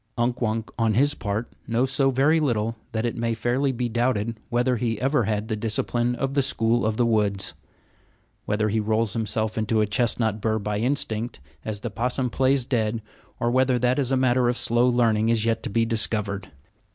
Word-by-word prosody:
Unk 120 +1 0
Wunk, 110 -1 -1
on 110 -2 +2
his 145 +4 +4
part, 110 -1 -4
knows 120 +3 +1
so 135 0 +2
very 140 +5 +3
little 115 -6 0 0.2
that 110 +1 -1
it 120 - -2
may 115 -1 -1
fairly 125 +5 0
be 125 -1 -2
doubted 115 -2 -1
whether 125 +1 +1
he 115 -1 -1
ever 135 +4 +1
had 105 0 -1
the 110 - -1
discipline 120 +2 -1
of 135 +2 -2
the 140 - +3
school 120 -3 +1
of 110 0 -1
the 120 - +3
woods. 105 -4 +1 0.9
Whether 105 +1 0
he 110 +2 +1
rolls 110 -1 0
himself 110 0 -1
into 110 +1 +1
a 105 - +3
chestnut 110 0 0
bur 110 +1 +1
by 105 -1 -2
instinct, 120 -2 -2 0.2
as 105 -2 -4
the 120 - -4
possum 125 +3 -1
plays 130 0 +2
dead, 115 -3 -1 0.4
or 120 - +1
whether 130 0 +3
that 125 +3 +1
is 135 -2 -1
a 135 - +3
matter 130 -1 +3
of 120 - -1
slow 120 +2 +2
learning 115 -2 +2
is 115 -1 +2
yet 115 -1 +1
to - - -4
be 115 +2 +1
discovered. 105 -3 -1
115 Hz, 200 wpm, -24 LUFS, 110-125 Hz, 0.9 s, his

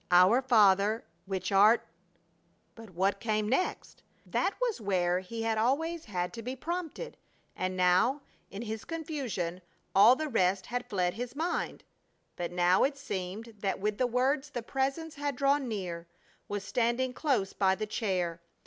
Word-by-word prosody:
"Our 185 +8 +6
Father 215 -3 +4 0.2
which 190 -1 -3
art" 215 +4 +5 0.9
but 225 -2 -12
what 190 +3 0
came 215 -1 0
next? 270 +11 -1 0.2
That 395 - 0
was 485 - -1
where 180 -3 +1
he 225 +5 -6
had 225 -1 0
always 320 +8 0
had 180 -2 -3
to 230 - -6
be 250 +3 -4
prompted, 345 - -5 0.4
and 185 0 -2
now, 185 +10 +3 0.3
in 200 +4 -6
his 220 -1 -5
confusion, 265 - -4 0.3
all 215 +6 +8
the 310 +3 -3
rest 190 -6 +1
had 245 +1 -4
fled 180 -3 0
from - - -11
his 245 +1 -5
mind. 335 +4 -2 0.5
But 175 -1 -4
now 180 +1 +3
it 280 +1 +1
seemed 215 -2 -5
that 195 -1 -1
with 210 +1 -1
the 255 - +3
words 270 +4 +1
the 240 -5 -5
Presence 275 +6 -2
had 285 -2 -3
drawn 275 +1 +2
near, 180 -6 -4 0.4
was 205 -1 -3
standing 240 +4 0
close 255 -10 0
by 190 -1 +2
the 215 - -3
chair. 180 -6 -2
220 Hz, 160 wpm, -30 LUFS, 190-265 Hz, 0.9 s, all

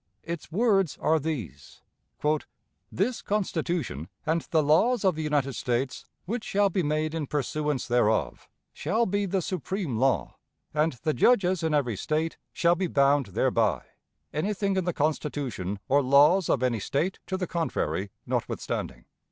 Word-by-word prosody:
Its 170 -1 -6
words 195 - +2
are 160 0 +3
these: 125 - -6 1.1
"This 230 +6 -1
Constitution, 170 - -2 0.2
and 160 +1 +1
the 160 -2 +3
laws 200 - +3
of 190 - +4
the 160 - -4
United 145 -3 0
States, 125 +2 -2 0.2
which 220 +5 -3
shall 200 0 +2
be 185 - +1
made 155 0 0
in 160 -3 -3
pursuance 150 -1 -1
thereof, 115 -3 +1 0.2
shall 220 +10 0
be 200 0 0
the 190 -1 0
supreme 185 - -3
law, 135 +3 +1 0.4
and 150 +1 +2
the 155 - +1
judges 185 - +3
in 160 -2 +1
every 125 -7 +1
State 155 +8 -1
shall 170 0 +3
be 180 +1 -1
bound 140 -3 +3
thereby, 115 -7 +2 0.5
anything 195 +4 0
in 190 -2 0
the 175 - +1
Constitution 145 - -2
or 140 +2 +4
laws 145 +7 +5
of 130 - +2
any 120 -3 +1
State 160 - -1
to 190 - -2
the 185 - -2
contrary 100 - -2 0.2
notwithstanding. - - -3
155 Hz, 150 wpm, -27 LUFS, 135-185 Hz, 1.1 s, laws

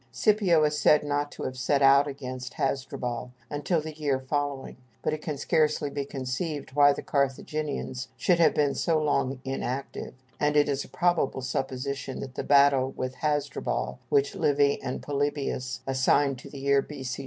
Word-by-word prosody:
Scipio 200 -7 +3
is 150 0 +1
said 150 - +5
not 145 0 -1
to - - -7
have 130 - -3
set 140 +2 +1
out 140 +1 +6
against 130 -3 -6
Hasdrubal 125 -2 -3 0.2
until 145 +4 0
the 155 0 -7
year 145 -3 -1
following, 140 0 -3 0.3
but - - 0
it 155 - -4
can 150 -3 -4
scarcely 150 0 +1
be 140 -1 -3
conceived 135 +2 -4
why 145 0 +6
the - - -4
Carthaginians 140 -1 -2
should 175 -3 +2
have 160 -2 +4
been 145 -2 +2
so 165 -2 +1
long 140 -3 0
inactive, 135 0 -4 0.2
and 150 0 +2
it 145 - +5
is 140 -1 -1
a - - -12
probable 175 -7 +1
supposition 135 +1 -3
that 130 -2 -7
the - - -4
battle 140 -2 +5
with 130 0 -3
Hasdrubal, 145 0 -1
which 420 -2 +2
Livy 145 -1 +2
and 130 -1 -4
Polybius 140 -3 -2
assign 135 +1 +2
to 125 - -11
the 140 - -10
year 140 0 +3
B.C. 130 -3 -6
140 Hz, 170 wpm, -27 LUFS, 130-150 Hz, 0.3 s, out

